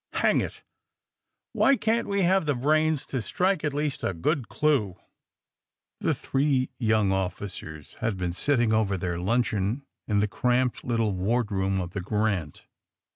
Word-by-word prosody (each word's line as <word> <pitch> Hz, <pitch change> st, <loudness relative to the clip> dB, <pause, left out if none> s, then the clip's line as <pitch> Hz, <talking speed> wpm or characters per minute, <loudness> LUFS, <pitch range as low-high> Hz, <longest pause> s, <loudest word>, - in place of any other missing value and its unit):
Hang -, -, +3 dB
it! -, -, -6 dB, 0.9 s
Why 275 Hz, -, +4 dB
can't 230 Hz, -1 st, 0 dB
we 200 Hz, -1 st, +1 dB
have 185 Hz, -2 st, +3 dB
the 145 Hz, -, +2 dB
brains 155 Hz, +3 st, +2 dB
to 130 Hz, -, -3 dB
strike 180 Hz, -, 0 dB
at 150 Hz, -, 0 dB
least 145 Hz, 0 st, -2 dB
a 95 Hz, -, -1 dB
good 125 Hz, -, -1 dB
clue?'* 135 Hz, -, +1 dB, 1.0 s
The -, -, +1 dB
three 135 Hz, -2 st, 0 dB
young 110 Hz, -4 st, +2 dB
officers 90 Hz, -5 st, -4 dB
had 110 Hz, -4 st, -1 dB
been 90 Hz, -1 st, -2 dB
sitting 120 Hz, +1 st, +2 dB
over 105 Hz, -3 st, +1 dB
their 90 Hz, -1 st, -3 dB
luncheon 110 Hz, +4 st, 0 dB, 0.2 s
in 105 Hz, -2 st, +2 dB
the 105 Hz, -, +2 dB
cramped 125 Hz, +3 st, 0 dB
little 115 Hz, -3 st, 0 dB
wardroom 95 Hz, -1 st, 0 dB
of 90 Hz, -1 st, -4 dB
the 100 Hz, -, -4 dB
^^ -, -, -9 dB
Grant." 100 Hz, -6 st, -1 dB
115 Hz, 155 wpm, -26 LUFS, 95-145 Hz, 1.0 s, Why